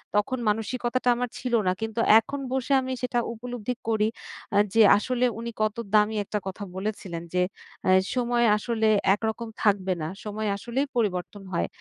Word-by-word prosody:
তখন 255 +6 +1
মানসিকতাটা 240 +3 0
আমার 245 0 -2
ছিল 245 -2 0
না। 185 - +2
কিন্তু 225 +1 -3 0.2
এখন 280 +5 -5
বসে 265 +1 0
আমি 260 0 -3
সেটা 250 -1 0
উপলব্ধি 245 0 -4 0.2
করি 215 -1 +2 0.5
আ - - +5 0.2
যে 225 - +5 0.2
আসলে 250 +3 0
উনি 235 0 -4
কত 215 -1 +1 0.2
দামি 210 +1 +4
একটা 210 - -2
কথা 190 +2 -5
বলেছিলেন 190 -4 -4
যে, 180 - +2 0.5
আ - - +4 0.3
সময় 240 -1 +2
আসলে 220 0 0 0.3
একরকম 220 +2 -3 0.2
থাকবে 195 -3 +2
না। 155 - -2 0.2
সময় 215 +1 -3
আসলেই 250 +7 -2
পরিবর্তন 195 -2 -1
হয় - - 0
225 Hz, 165 wpm, -26 LUFS, 210-245 Hz, 0.5 s, আ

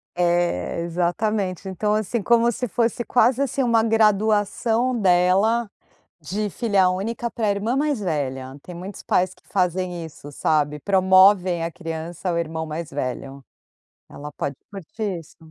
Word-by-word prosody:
É, 175 - 0
exatamente, 185 +3 -1
então, 210 +3 -1
assim, 215 +2 -1
como 235 +2 +3
se 250 +2 -3
fosse 235 +2 0
quase, 250 +2 +3
assim, 275 0 0
uma 230 -2 +3
graduação 220 +2 +2
dela 195 +5 +3 0.5
de 200 +7 -3
filha 200 -4 +2
única 225 +5 -3
para 220 -3 -1
irmã 205 +5 -1
mais 290 -3 +1
velha, 135 -7 -3
tem 180 - -10
muitos 185 +3 -8
pais 185 0 +1
que - - -27
fazem 180 -2 -1
isso, 145 -2 -11
sabe, 150 0 0
promovem 185 -1 +4
a 165 - -4
criança 165 +1 -6
ao 170 -1 0
irmão 160 -1 -3
mais 160 +1 -5
velho. 135 0 -5 0.7
Ela 150 +1 -9
pode 140 -1 -4
curtir 200 0 -5
isso. 160 - -18
185 Hz, 145 wpm, -23 LUFS, 170-220 Hz, 0.7 s, promovem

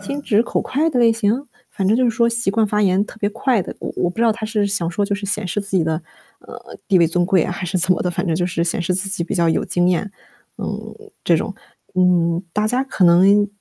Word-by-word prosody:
心 280 +1 -5
直 225 -4 +2
口 - - -2
快 305 +5 0
的 250 - -1
类 230 -1 +5
型？ 230 +5 0 0.2
反 190 - -2
正 205 - +3
就 255 +2 +2
是 - - +3
说 235 +1 +2
习 235 -3 0
惯 220 +2 +2
发 210 0 0
言 195 0 +2
特 220 - -13
别 205 - 0
快 230 +1 0
的。 - - -6
我 - - -5
我 175 - +1
不 - - -14
知 230 - 0
道 230 -2 +4
他 215 0 -5
是 215 -2 0
想 185 -4 -2
说 200 +4 -1
就 200 0 -1
是 200 0 -5
显 205 -1 -2
示 205 +4 -2
自 200 -1 -3
己 165 - +2
的， 160 0 -1 0.4
呃， - - -12
地 195 - +4
位 170 - +5
尊 175 +2 0
贵 185 -4 +3
还 180 +1 -4
是 185 +2 -2
怎 185 +1 +2
么 - - -2
的， 180 - -1
反 180 - -3
正 165 - +1
就 175 +1 0
是 175 -2 -1
显 170 - -1
示 175 +1 -1
自 190 +2 -2
己 200 -4 -2
比 180 - -4
较 170 -2 +2
有 160 - +1
经 175 0 +1
验， 185 +3 0 0.5
嗯， - - -6 0.3
这 - - +3
种。 - - -3 0.4
嗯， 175 -1 +2
大 210 +1 +1
家 250 +4 0
可 210 -8 0
能 195 +4 +5
200 Hz, 295 characters per minute, -20 LUFS, 180-220 Hz, 0.5 s, 类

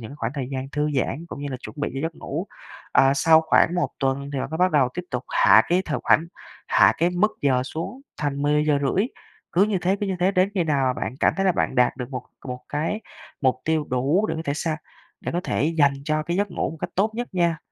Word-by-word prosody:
những 120 +5 -9
khoảng 140 - -3
thời 130 -3 -3
gian 130 0 -4
thư 150 +1 0
giãn 150 +5 -1
cũng - - -7
như 145 - -4
là 130 - -3
chuẩn - - -10
bị 145 - -1
cho 135 - -3
giấc 165 0 -2
ngủ. - - -4 0.5
Ờ, 135 0 +5
sau 160 +3 +5
khoảng 165 +2 +3
1 175 - +1
tuần 135 +1 -1
thì 135 - -2
bạn - - -4
mới 160 - -3
bắt 185 +1 +4
đầu 135 -4 +4
tiếp 180 - -3
tục 125 -1 -3
hạ 110 - +6
cái 180 +2 +2
thời 150 - -1
khoảnh 165 - +4 0.4
hạ - - +6
cái 170 +2 +2
mức 205 +5 +2
giờ 130 -3 +3
xuống 165 - -6 0.2
thành 145 -2 -2
10:30. 150 - +2 0.5
Cứ 180 - +4
như 205 -2 0
thế, 190 +3 +2
cứ 205 - 0
như 190 - -1
thế 185 - +4
đến 185 +1 +2
khi 180 -4 +1
nào 135 -5 +1
bạn - - -4
cảm - - +3
thấy 195 0 +1
là 185 - +4
bạn 150 - -1
đạt 125 0 +3
được 125 0 -6
một 125 -1 -4 0.3
một 125 0 -5
cái 160 +9 -1 0.4
mục 130 -2 +2
tiêu 160 -2 0
đủ 140 +11 +2
để - - -2
có 160 - -4
thể 140 - -1
sang 155 +1 -2 0.4
để - - -4
có 175 - 0
thể - - 0
dành 140 -2 +5
cho 155 0 0
cái 170 +3 -2
giấc 205 0 0
ngủ - - -2
một 160 - -9
cách - - -3
tốt 210 +4 +2
nhất 240 +1 -3
nha. 170 -2 +1
150 Hz, 255 wpm, -24 LUFS, 135-175 Hz, 0.5 s, hạ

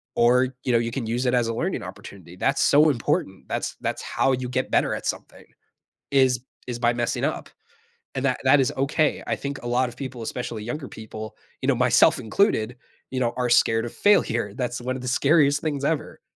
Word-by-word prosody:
or, 125 +2 +4
you 125 - 0
know, 120 - +4
you 115 0 -2
can 130 -1 -3
use 120 +3 -1
it 125 - +2
as 120 -2 +2
a 115 - -1
learning - - -2
opportunity. 90 -3 -11
That's 135 +9 0
so 150 +2 +5
important. 110 -7 -1
That's - - -3
that's - - -2
how 135 - 0
you 125 -1 -3
get 130 +1 -2
better - - +2
at - - -7
something, - - -5 0.7
is, 130 -3 +4 0.3
is 120 -1 -4
by 120 0 +2
messing 120 0 -2
up, - - -2 0.7
and 135 - -3
that 130 -2 +1
that 135 +2 +6
is 135 +2 +1
okay. 140 +3 +1
I - - -1
think 140 0 -5
a - - -7
lot 125 +1 +1
of 120 - -11
people, 130 -3 -6
especially 115 -1 -4
younger 135 +4 -5
people, 110 0 -9 0.3
you - - -1
know, 140 - +4
myself 125 0 +4
included, 125 - +1 0.3
you 130 - -2
know, 120 -2 +1
are 125 -1 0
scared 115 -1 +4
of 120 - -7
failure. 120 - +2
That's 125 0 -3
one 130 +1 -3
of 130 - -8
the 125 - -4
scariest 145 +2 +3
things 145 -3 -2
ever. 155 +1 -2
125 Hz, 215 wpm, -24 LUFS, 120-135 Hz, 0.7 s, that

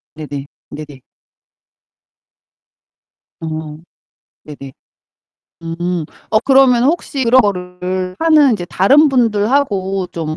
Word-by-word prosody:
네네. 145 -3 -7 0.3
네네. 145 -3 -10 2.4
어. 155 -1 -6 0.7
네네. 140 -3 -11 0.9
음 170 0 -3 0.3
어 215 - +3
그러면 265 -3 +4
혹시 280 -3 -1
그런 255 +3 +5
거를 185 -2 -3
하는 305 -5 +4
이제 185 -5 -3
다른 275 - +3
분들하고 210 -5 0
좀 155 -2 -5
185 Hz, 170 characters per minute, -16 LUFS, 160-255 Hz, 2.4 s, 그런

